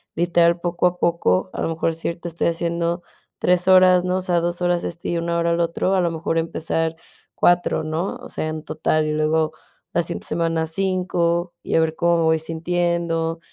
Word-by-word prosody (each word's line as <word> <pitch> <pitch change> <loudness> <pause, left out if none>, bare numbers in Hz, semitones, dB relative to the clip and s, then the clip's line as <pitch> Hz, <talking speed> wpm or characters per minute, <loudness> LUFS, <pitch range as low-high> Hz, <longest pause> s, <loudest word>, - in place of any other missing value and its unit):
literal, 170 0 +3
poco 175 +1 +1
a 180 0 -2
poco, 130 - +1
a - - -4
lo - - 0
mejor 165 0 -1
si 165 - -5
ahorita 170 +1 -4
estoy 170 +1 -1
haciendo 170 +1 -1 0.3
3 180 0 +2
horas, 185 -1 +6
¿no? 180 +1 0
O 185 - -2
sea, 175 -2 +1
2 175 +1 -2
horas 175 -1 +1
este 170 0 -5
y 170 - 0
1 170 0 -1
hora 170 0 +1
el 170 - 0
otro, 170 +3 0
a 190 - +3
lo 175 - +1
mejor 165 0 -1
empezar 165 0 -2 0.4
4, 175 -2 +2
¿no? 160 +4 -2
O - - -10
sea, 155 - -3
en 155 0 -5
total, 155 0 0
y 155 - -1
luego 155 +1 +1 0.4
la 175 - +4
siguiente - - -5
semana 165 -1 0
5, 175 -1 0
y - - -2
a - - +5
ver 160 -1 +1
cómo 170 0 +2
me 165 - +1
voy 160 0 +3
sintiendo. 165 0 -1
170 Hz, 210 wpm, -22 LUFS, 165-175 Hz, 0.4 s, horas